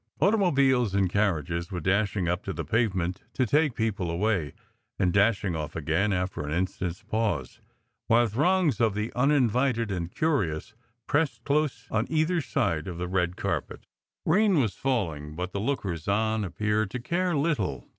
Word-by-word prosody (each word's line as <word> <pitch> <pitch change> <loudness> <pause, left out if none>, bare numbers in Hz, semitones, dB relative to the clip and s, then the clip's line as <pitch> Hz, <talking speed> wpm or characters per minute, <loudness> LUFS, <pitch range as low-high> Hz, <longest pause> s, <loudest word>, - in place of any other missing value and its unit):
Automobiles 140 - +3
and 95 -3 +2
carriages 85 -4 0
were 90 -3 -4
dashing 100 +1 +1
up 90 0 0
to - - -4
the - - -4
pavement 95 -5 0
to 130 - +1
take 145 +1 +2
people 105 -6 -1
away, 85 -4 0 0.4
and 90 -2 +1
dash 100 +1 +3
ing 90 -4 -1
off 75 -2 -5
again 90 +6 0
after 90 0 -1
an 75 0 -4
instant 90 +2 -1
s 90 - -20
pause, 105 - -2 0.5
while 120 +1 +5
throngs 145 - +2
of 110 -3 +2
the 105 +2 -3
uninvited 125 -4 +2
and 85 -3 -3
curious 115 - -1 0.3
pressed 145 -6 0
close 150 +1 0
on 110 0 0
either 160 +2 +1
side 85 - -1
of 90 -3 -5
the 90 +1 -3
red 90 -1 0
carpet. - - -3 0.4
Rain 195 0 +4
was 110 -8 +1
falling, 80 - -2
but 90 +2 -4
the 100 - -3
lookers 100 - -2
on 110 +2 +1
appeared 105 +3 -1
to 125 - -4
care 175 +5 0
little. 105 - -1
105 Hz, 165 wpm, -27 LUFS, 90-130 Hz, 0.5 s, while